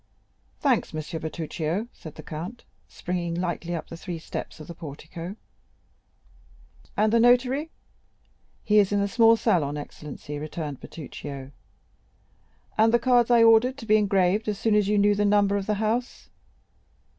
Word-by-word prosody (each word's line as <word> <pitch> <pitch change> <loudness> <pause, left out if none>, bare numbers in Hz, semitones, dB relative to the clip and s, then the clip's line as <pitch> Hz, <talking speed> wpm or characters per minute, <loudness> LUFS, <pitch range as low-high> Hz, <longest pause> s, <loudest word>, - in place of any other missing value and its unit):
"Thanks, 255 - +1
M. - - -2 0.2
Bertuccio," 160 +5 -3
said 155 - -11
the - - -10
count, 175 +10 -7 0.2
springing 175 -1 -3
lightly 175 -1 -2
up 165 - -5
the - - -8
three 175 0 -6
steps 160 - -7
of 155 - -9
the 170 - -8
portico; 165 +4 -8 1.6
"and 215 +1 +3
the 230 - +5
notary?" 250 +6 +3 0.9
"He 210 -1 +4
is 200 -1 +3
in 205 - +2
the 200 - +1
small 230 +1 +5
salon, 160 -11 +1
excellency," 145 0 -8
returned 150 -2 -5
Bertuccio. 140 -3 -8 1.3
"And 225 +1 +5
the 240 - +5
cards 240 0 +3
I 235 -1 +6
ordered 230 +4 +5
to 245 - -9
be 215 -1 +5
engraved 195 0 +2
as 210 -2 -1
soon 225 +1 +1
as 210 -2 +3
you 210 0 +2
knew 205 0 +4
the 205 0 0
number 205 -1 +3
of 200 -1 -2
the 210 - +1
house?" 220 +4 -2
200 Hz, 155 wpm, -26 LUFS, 165-225 Hz, 1.6 s, I